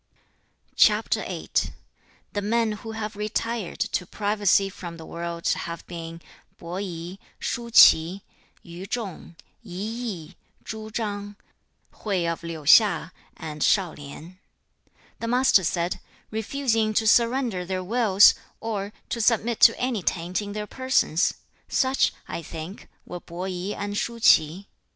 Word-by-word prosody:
The 205 - -1
men 225 +2 +1
who 220 +1 -7
have 215 -1 -5
retired 215 0 -3
to 180 - -1
privacy 205 -2 +2
from 175 -3 -8
the 160 - -10
world 170 0 -5
have 170 0 -3
been 165 -1 -8 0.3
Po 170 +2 -6
i, 180 -1 -6 0.2
Shu 235 0 -4
ch'i, 180 -3 +6 0.4
Yu 175 +3 -9
chung, 200 -7 -5 0.3
I 220 - -14
yi, 195 -3 -5 0.3
Chu 220 0 -6
chang, 205 -2 -4 0.6
Hui 190 -5 -2
of 170 0 -2
Liu 165 -2 -6
hsia, 185 +1 +5 0.3
and 155 -2 -7
Shao 190 -5 +3
lien. 155 +6 -11 0.5
2. - - -36 0.3
The 230 - -4
Master 245 -5 +4
said, 170 +1 -1 0.3
'Refusing 220 -1 0
to 220 - +2
surrender 235 -3 +3
their 185 +1 -3
wills, 205 -1 +5 0.3
or 210 -2 -4 0.2
to 235 - -2
submit 230 0 +2
to - - +6
any 245 -5 -1
taint 175 +2 -1
in 205 -1 -6
their 210 0 -4
persons; 260 -9 +1 0.3
such, 265 +1 +2 0.2
I - - -5
think, 165 +4 -8 0.2
were 180 - -7
Po 175 +1 -8
i 185 +1 -3
and 205 0 -4
Shu 235 +3 -2
ch'i. 170 -3 +4
200 Hz, 135 wpm, -25 LUFS, 170-220 Hz, 0.6 s, ch'i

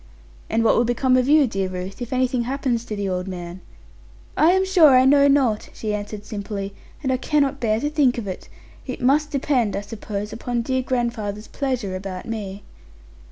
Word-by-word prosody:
'And 225 - +1
what 225 - +4
will 235 - +3
become 245 +2 +2
of 255 0 +2
you, 300 0 +6
dear 195 -5 -2
Ruth, 185 +3 -6
if 245 +1 -5
anything 255 -1 +1
happens 255 -3 -1
to 215 - -4
the 200 -1 -2
old 180 0 -2
man?' 180 -1 -7 0.7
'I 320 +3 +5
am 380 0 +2
sure 340 -8 +6
I 255 - +5
know 280 +1 +6
not,' 265 -7 +2
she 215 -2 -3
answered 210 0 -5
simply; 200 -2 -5 0.3
'and 265 - 0
I 255 - +2
cannot 280 0 +1
bear 220 -2 +1
to 290 - -1
think 280 -5 +2
of 225 -4 -4
it. 185 - -7 0.4
It 255 - -5
must 290 +4 +2
depend, 265 -7 0
I 200 - -2
suppose, 210 0 -6
upon 240 0 -2
dear 260 +1 0
grandfather's 235 -5 -2
pleasure 255 -9 -2
about 185 -1 -6
me.' 205 -3 -5
235 Hz, 195 wpm, -22 LUFS, 205-265 Hz, 0.7 s, you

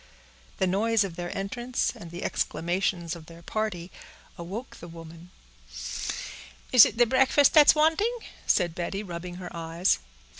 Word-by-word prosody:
The 190 - +1
noise 210 +4 +2
of 185 -4 -6
their 175 0 -5
entrance, 240 +6 -2
and 170 - -10
the 175 +1 -7
exclamations 175 0 -1
of 160 -2 -12
their 170 0 -13
party, 190 -4 -3 0.4
awoke 195 +8 -7
the 170 - -10
woman. 165 +1 -12 1.4
"Is 250 -3 +10
it - - -4
the 240 - +6
breakfast 265 +3 +4
that's 300 -2 +8
wanting?" 325 +11 +2 0.3
said 175 -4 +2
Betty, 185 +4 -4
rubbing 175 -1 -7
her 180 -1 -8
eyes. 165 +2 0
185 Hz, 145 wpm, -27 LUFS, 170-230 Hz, 1.4 s, Is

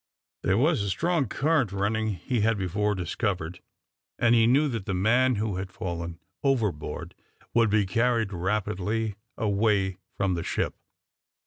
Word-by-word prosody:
There 95 +1 +2
was 150 +1 +3
a 100 - -1
strong 160 - +1
current 145 - +1
running, 105 +2 0
he 110 +7 -1
had 110 +1 +2
before 105 +2 0
discovered, 90 -1 -2 0.6
and 120 0 +4
he 115 -1 +5
knew 140 +5 +4
that 115 -7 -4
the 95 - 0
man 120 +7 +3
who 105 -2 -1
had 95 0 -4
fallen 85 -2 -5 0.2
overboard 110 - -1 0.4
would 115 -2 +4
be 105 -1 +3
carried 115 0 +1
rapidly 105 +3 -1 0.2
away 100 -3 +1 0.2
from 100 -2 +1
the 85 - -2
ship. - - -1
105 Hz, 145 wpm, -27 LUFS, 95-115 Hz, 0.6 s, he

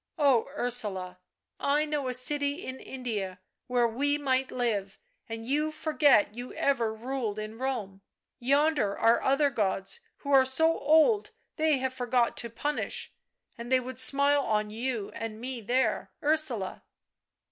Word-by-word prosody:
" - - -55
Oh, 275 -7 +3
Ursula, 200 -7 0 0.4
I 295 +2 +2
know 295 -3 -2
a 250 - +1
city 285 +5 +1
in 260 0 -6
India 210 -8 -5 0.3
where 245 -2 +2
we 285 +6 0
might 265 -2 0
live, 210 -6 -2 0.3
and 225 0 -6
you 300 +5 0
forget 300 -9 +3
you 245 +2 -7
ever 255 -6 +1
ruled 230 -1 -4
in 215 +1 -6
Rome; 215 -8 -3 0.4
yonder 280 -4 +2
are 230 +1 +4
other 275 +1 +2
gods 195 - -1 0.2
who 285 - -4
are 270 -1 +7
so 320 +6 +2
old 320 +9 +4 0.3
they 310 -2 +3
have 260 0 -2
forgot 245 -1 +1
to 235 - -4
punish, 290 +6 -3 0.5
and 235 +2 -7
they 260 - +5
would 255 0 -5
smile 280 +2 +4
on 210 -4 -1
you 230 -2 -3
and 225 -1 -6
me 250 0 -5
there, 240 +1 0
Ursula. 290 -10 0
255 Hz, 150 wpm, -28 LUFS, 225-285 Hz, 0.5 s, are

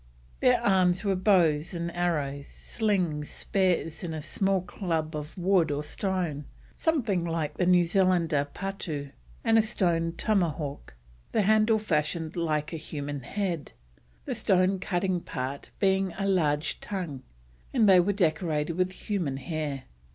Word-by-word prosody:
Their 250 -1 +4
arms 185 -3 +3
were 200 -2 +1
bows 175 -4 +3
and 170 0 -4
arrows, 145 -5 -1
slings, 180 -9 -1
spears, 180 -4 0
and 165 -2 -3
a 155 - -4
small 195 +5 +1
club 165 -4 -3
of 150 +3 -6
wood 180 -2 +3
or 145 0 -1
stone, 165 -3 -2 0.3
something 235 - +1
like 165 -3 -2
the 180 - +1
New 180 -1 +6
Zealander's 170 -5 +2
patoo, 165 -8 -4 0.3
and 225 0 +5
a - - +7
stone 170 -6 +1
tomahawk, 160 - -1 0.4
the 215 - +3
handle 215 +2 +4
fashioned 160 -4 -1
like 160 -2 -1
a - - -2
human 145 -2 -5
head, 170 +2 -3 0.5
the - - -2
stone 185 0 +2
cutting 180 -1 0
part 135 -2 -5
being 190 -2 +2
a 195 - -1
large 150 -7 +1
tongue, 175 -10 -5 0.5
and 230 -5 +3
they 190 -2 +8
were 185 +3 +3
decorated 165 -4 0
with 185 0 +1
human 175 -11 -2
hair. 145 -2 -4
175 Hz, 145 wpm, -28 LUFS, 150-195 Hz, 0.5 s, they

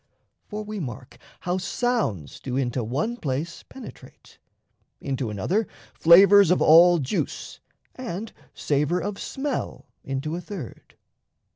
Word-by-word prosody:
For 210 0 -5
we 210 0 -6
mark 125 -5 -8 0.2
How 180 +1 -1
sounds 185 - -2
do 130 -1 -4
into 125 -2 -1
one 150 - -2
place 150 - -3
penetrate, 265 - -14 0.6
Into 135 -4 -3
another 175 - -1 0.3
flavours 195 +3 +7
of 180 - +3
all 170 +3 +7
juice, 145 +6 -3 0.3
And 225 -4 -6 0.2
savour 150 +4 0
of 200 +2 -4
smell 275 0 -4 0.2
into 135 +4 -3
a 175 - -5
third. 175 - -9
170 Hz, 120 wpm, -25 LUFS, 135-205 Hz, 0.6 s, flavours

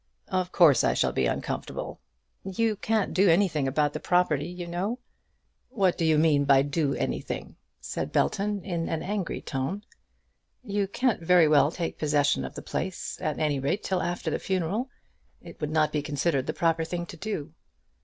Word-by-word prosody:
"Of 185 -1 -1
course 155 -7 +5
I - - +2
shall - - +2
be - - +1
uncomfortable." - - -4 0.4
"You 215 +3 0
can't 215 0 0
do 195 0 +4
anything 165 -5 +3
about 145 +2 +1
the - - -3
property, 165 -5 +1
you 180 0 -6
know." 185 +7 -2 0.7
"What 195 -8 +2
do - - -2
you 160 -1 +4
mean 150 -2 +4
by 140 -1 +5
doing 145 0 -1
anything?" - - -3 0.2
said - - -4
Belton, 205 0 0
in 170 -4 -2
an 160 -1 -2
angry 195 -2 -3
tone. 150 +9 -3 0.8
"You 205 -3 -1
can't 240 0 0
very 170 -1 +5
well 150 -1 +5
take 170 0 -4
possession 145 - +2
of 65 - -7
the - - -7
place, 185 0 -4
at 155 -2 -1
any 150 -3 0
rate, 140 +10 -1
till 185 -2 0
after 175 0 -2
the - - -1
funeral. 190 +7 -1 0.5
It - - -13
would 150 - -1
not 155 -1 +2
be 150 - 0
considered 145 -1 -1
the - - -1
proper 165 -1 +1
thing 175 +1 -4
to 170 - -10
do." 160 -5 -4
170 Hz, 180 wpm, -27 LUFS, 150-190 Hz, 0.8 s, course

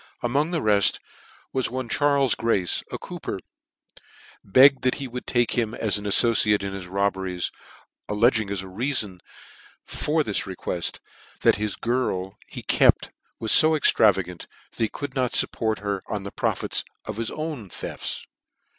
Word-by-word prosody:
Among 140 +6 +1
the 170 -3 -2
reft, 105 -2 +3 0.5
one 130 -1 -2
Charles 140 0 +2
Grace, 100 -6 0
a - - -3
cooper, - - -6 1.1
begged 135 +7 +6
that 130 0 +1
he 140 - -5
would 125 0 -7
take 120 -2 +1
him 115 -2 0
as 105 -2 +1
an 105 - -9
aflbciare 105 -1 +3
in 100 0 -4
his 95 -2 -6
robberies, 95 -2 -1 0.6
allcdging 110 0 +2
as 100 -2 -2
a - - -9
reafon 105 -1 -1 0.7
for 155 +1 0
th;s 105 -6 -1
re 95 - -6
quclt, 90 -1 -2 0.4
that - - +4
the 105 -1 -2
girl 105 -6 -1
he - - -8
kcpr - - +4 0.3
was 110 - +3
fo 160 0 +6
extravagant, 95 - +2 0.2
that - - -16
he - - -4
ou!d 145 -2 -3
not 125 -2 0
iupport 110 -3 0
her 100 -2 -2
on 105 -2 -4
the 100 - -7
profits - - -1 0.2
of 110 - -6
his 115 0 -2
thcns. 150 - -5
110 Hz, 155 wpm, -24 LUFS, 100-130 Hz, 1.1 s, begged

